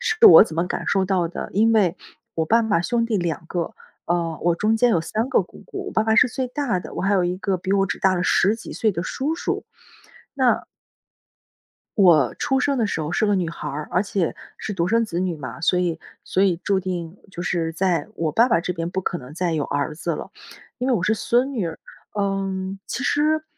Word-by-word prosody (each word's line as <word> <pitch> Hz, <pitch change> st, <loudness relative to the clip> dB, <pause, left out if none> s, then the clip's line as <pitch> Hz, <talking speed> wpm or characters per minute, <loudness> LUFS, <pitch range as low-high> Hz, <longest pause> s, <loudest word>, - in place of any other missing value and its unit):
是 460 Hz, -2 st, +5 dB
我 410 Hz, -, +11 dB
怎 165 Hz, -7 st, -4 dB
么 170 Hz, +2 st, +1 dB
感 -, -, -3 dB
受 195 Hz, -1 st, +2 dB
到 185 Hz, -3 st, +1 dB
的， 175 Hz, -, -6 dB
因 225 Hz, +3 st, +3 dB
为， 190 Hz, -5 st, +3 dB, 0.4 s
我 160 Hz, -, 0 dB
爸 230 Hz, +8 st, +3 dB
爸 210 Hz, -6 st, +1 dB
兄 230 Hz, +6 st, 0 dB
弟 225 Hz, -2 st, 0 dB
两 170 Hz, -2 st, -2 dB
个， 170 Hz, 0 st, -3 dB, 0.3 s
呃， 170 Hz, -2 st, -1 dB
我 175 Hz, 0 st, +3 dB
中 215 Hz, +4 st, +2 dB
间 245 Hz, +2 st, +3 dB
有 175 Hz, -, +2 dB
3 215 Hz, +9 st, -2 dB
个 265 Hz, -, +3 dB
姑 -, -, -15 dB
姑， 390 Hz, 0 st, -6 dB
我 -, -, -8 dB
爸 220 Hz, -, +2 dB
爸 220 Hz, 0 st, +2 dB
是 240 Hz, -, +7 dB
最 255 Hz, +1 st, -3 dB
大 250 Hz, -8 st, -1 dB
的， -, -, -10 dB
我 -, -, -3 dB
还 195 Hz, +2 st, +2 dB
有 190 Hz, -, +3 dB
一 175 Hz, +1 st, -1 dB
个 195 Hz, 0 st, -1 dB
比 185 Hz, +2 st, -3 dB
我 195 Hz, -1 st, +3 dB
只 -, -, -4 dB
大 190 Hz, -1 st, +3 dB
了 175 Hz, -, 0 dB
10 205 Hz, +4 st, +3 dB
几 -, -, -9 dB
岁 220 Hz, -, +1 dB
的 175 Hz, -3 st, -3 dB
叔 290 Hz, +10 st, -2 dB
叔， -, -, -2 dB, 0.7 s
那 260 Hz, -3 st, +2 dB, 1.3 s
我 170 Hz, -, +5 dB
出 265 Hz, -, 0 dB
生 275 Hz, +1 st, +1 dB
的 225 Hz, -, +2 dB
时 180 Hz, -, -2 dB
候 150 Hz, +3 st, -4 dB
是 215 Hz, -, +2 dB
个 205 Hz, -, +2 dB
女 180 Hz, -4 st, 0 dB
孩 160 Hz, -2 st, -6 dB
儿， 150 Hz, +1 st, -5 dB
而 180 Hz, +1 st, +2 dB
且 195 Hz, -4 st, -1 dB, 0.2 s
是 215 Hz, -, -5 dB
独 175 Hz, -3 st, 0 dB
生 230 Hz, +2 st, +3 dB
子 175 Hz, -5 st, -3 dB
女 180 Hz, -3 st, -1 dB
嘛， 130 Hz, 0 st, -8 dB
所 180 Hz, +2 st, +2 dB
以 170 Hz, -3 st, -1 dB, 0.2 s
所 190 Hz, -, +1 dB
以 190 Hz, -3 st, +3 dB
注 195 Hz, -1 st, +2 dB
定 180 Hz, -1 st, -5 dB
就 175 Hz, -2 st, -6 dB
是 170 Hz, -2 st, -1 dB
在 180 Hz, +1 st, 0 dB
我 160 Hz, -4 st, -2 dB
爸 235 Hz, -, +4 dB
爸 225 Hz, -, +3 dB
这 180 Hz, -, -2 dB
边 165 Hz, -1 st, -3 dB
不 190 Hz, -, -2 dB
可 175 Hz, -, -2 dB
能 130 Hz, +1 st, -11 dB
再 175 Hz, 0 st, -1 dB
有 155 Hz, -3 st, 0 dB
儿 145 Hz, +3 st, -2 dB
子 170 Hz, +2 st, -3 dB
了， -, -, -6 dB, 0.5 s
因 255 Hz, +1 st, -1 dB
为 260 Hz, -, +3 dB
我 190 Hz, -, 0 dB
是 215 Hz, -, +2 dB
孙 245 Hz, +5 st, +1 dB
女 220 Hz, -9 st, -1 dB
儿。 165 Hz, -, -6 dB, 0.4 s
嗯， 195 Hz, -1 st, -2 dB
其 255 Hz, -, -4 dB
实 310 Hz, +1 st, +2 dB
190 Hz, 250 characters per minute, -22 LUFS, 170-225 Hz, 1.3 s, 我